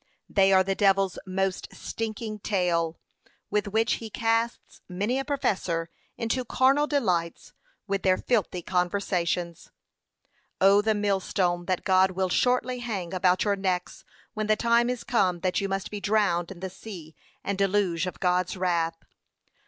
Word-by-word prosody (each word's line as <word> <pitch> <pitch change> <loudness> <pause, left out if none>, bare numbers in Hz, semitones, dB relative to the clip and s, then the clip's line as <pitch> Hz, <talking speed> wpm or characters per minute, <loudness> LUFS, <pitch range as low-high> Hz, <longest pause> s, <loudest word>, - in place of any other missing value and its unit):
They 195 -1 +3
are 190 0 +6
the 195 +1 0
devil's 195 -1 +2
most 190 0 -1
stinking 220 -1 -5
tail, 175 -5 0 0.5
with 210 0 0
which 220 +3 +1
he 225 - -6
casts 230 +1 -1
many 205 +8 -1
a - - -1
professor 185 - -1 0.3
into 240 +2 -1
carnal 270 +5 +3
delights, 180 - -1 0.3
with 195 -1 -1
their 185 -1 +3
filthy 195 -7 -1
conversations.' 180 -2 -1
p. - - -25 0.9
530. 195 +1 +7
'Oh! 205 - +5
the 215 0 +1
millstone 185 -3 0
that 185 0 -1
God 190 0 +4
will 190 0 0
shortly 250 +4 +1
hang 200 -7 -4
about 185 0 +2
your 205 -1 +1
necks, 185 -2 -2 0.3
when 215 -1 -2
the 215 - +4
time 235 +2 +2
is 250 -1 -3
come 185 -9 +1
that 185 +1 0
you 195 - -2
must 195 0 -3
be 205 -1 -5
drowned 195 -4 +1
in 180 -2 -10
the 190 -1 -4
sea 175 -6 -10 0.3
and 200 - -1
deluge 190 -3 +1
of 180 - -6
God's 180 0 +1
wrath.' 170 -3 -1
195 Hz, 160 wpm, -26 LUFS, 180-215 Hz, 0.9 s, 530